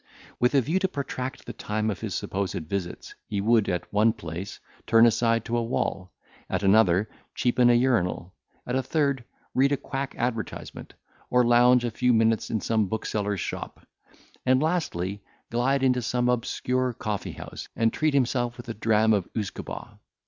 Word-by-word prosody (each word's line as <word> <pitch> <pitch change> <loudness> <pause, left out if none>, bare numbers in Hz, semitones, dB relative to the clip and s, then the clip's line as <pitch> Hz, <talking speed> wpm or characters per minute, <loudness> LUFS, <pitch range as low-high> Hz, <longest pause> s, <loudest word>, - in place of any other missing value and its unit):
With 125 +3 +2
a 135 - +6
view 160 +10 0
to 190 - +1
protract 135 -5 -5
the - - -6
time 110 +1 -2
of 100 - -6
his - - -3
supposed 95 -2 -2
visits, 90 +1 -5
he 100 - -2
would, 110 +1 +3
at 90 +2 -3
one 110 +2 +4
place, 90 -2 -7 0.3
turn 115 +1 +6
aside 115 0 +2
to 120 - -2
a - - +1
wall; 95 -5 -2 0.4
at - - -1
another, 100 -1 +4 0.3
cheapen 125 0 +3
an 120 - +6
urinal; 95 -8 0 0.3
at 125 - -3
a 130 - +2
third 140 0 +1
corner, 120 - -17 0.3
read 135 +2 +3
a - - +1
quack 135 +1 -5
advertisement, 115 -3 -4 0.3
or 125 0 +4
lounge 120 +1 +5
a 120 - -1
few 125 +2 +2
minutes 115 0 +2
in 110 -3 -1
some 110 -3 +1
bookseller's 105 -2 -2
shop; - - -6 0.6
and, 130 0 +4
lastly, 105 - -1 0.3
glide 130 +3 +1
into 125 -1 +3
some 125 +1 0
obscure 125 +1 0
coffee 105 -3 -4
house, - - -8
and 115 0 +2
treat 155 -2 +1
himself 120 -2 +1
with 120 - -10
a - - -2
dram 110 0 +3
of 100 -4 0
usquebaugh. 105 -4 -5
115 Hz, 175 wpm, -26 LUFS, 105-125 Hz, 0.6 s, a